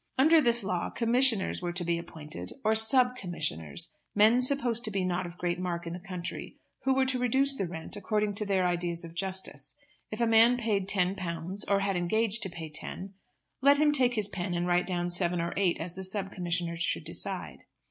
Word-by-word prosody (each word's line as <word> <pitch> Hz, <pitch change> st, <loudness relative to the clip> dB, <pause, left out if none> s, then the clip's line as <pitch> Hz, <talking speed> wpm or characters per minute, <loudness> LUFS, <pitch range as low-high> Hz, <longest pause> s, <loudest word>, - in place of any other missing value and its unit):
Under 315 Hz, +4 st, +5 dB
this 240 Hz, -3 st, +5 dB
law 180 Hz, -3 st, -2 dB
commissioners 235 Hz, -4 st, +2 dB
were 175 Hz, -1 st, -3 dB
to 175 Hz, 0 st, -1 dB
be 170 Hz, 0 st, -1 dB
appointed, 155 Hz, -1 st, -9 dB
or 220 Hz, 0 st, +2 dB
sub 250 Hz, +3 st, +5 dB
commissioners, 150 Hz, -, -4 dB, 0.2 s
men 220 Hz, +4 st, +5 dB
supposed 250 Hz, -3 st, +3 dB
to -, -, +2 dB
be 195 Hz, -3 st, -2 dB
not 180 Hz, 0 st, -2 dB
of 175 Hz, 0 st, -12 dB
great 175 Hz, 0 st, -2 dB
mark 175 Hz, -1 st, -4 dB
in 170 Hz, -, -5 dB
the 180 Hz, -, -6 dB
country, 180 Hz, -1 st, -7 dB, 0.3 s
who 265 Hz, 0 st, +2 dB
were 265 Hz, 0 st, +2 dB
to 260 Hz, -1 st, +1 dB
reduce 265 Hz, +3 st, +5 dB
the 195 Hz, -7 st, -3 dB
rent 160 Hz, -2 st, -7 dB
according 210 Hz, +1 st, -1 dB
to 210 Hz, +1 st, -1 dB
their 190 Hz, -2 st, +1 dB
ideas 175 Hz, -1 st, -1 dB
of 165 Hz, -, -11 dB
justice. 190 Hz, +2 st, -3 dB, 0.3 s
If 215 Hz, -, -7 dB
a 235 Hz, -, +2 dB
man 230 Hz, +2 st, +5 dB
paid 205 Hz, -5 st, -1 dB
ten 185 Hz, -2 st, +2 dB
pounds, 180 Hz, +1 st, -3 dB
or 200 Hz, -1 st, +1 dB
had 195 Hz, -1 st, -1 dB
engaged 215 Hz, +5 st, 0 dB
to 190 Hz, -, -2 dB
pay 165 Hz, -2 st, -8 dB
ten, 185 Hz, +5 st, -6 dB, 0.5 s
let 280 Hz, +2 st, +5 dB
him 300 Hz, 0 st, +3 dB
take 250 Hz, -4 st, +2 dB
his 210 Hz, -3 st, +1 dB
pen 180 Hz, -3 st, -4 dB
and 175 Hz, 0 st, -1 dB
write 180 Hz, 0 st, +1 dB
down 175 Hz, -2 st, -2 dB
seven 175 Hz, 0 st, 0 dB
or 170 Hz, +1 st, -3 dB
eight 190 Hz, -3 st, +1 dB
as 170 Hz, +1 st, -5 dB
the 190 Hz, +1 st, -7 dB
sub 195 Hz, +1 st, -1 dB
commissioner 175 Hz, -1 st, -3 dB
should 170 Hz, -, -1 dB
decide. -, -, -4 dB
190 Hz, 210 wpm, -28 LUFS, 175-225 Hz, 0.5 s, Under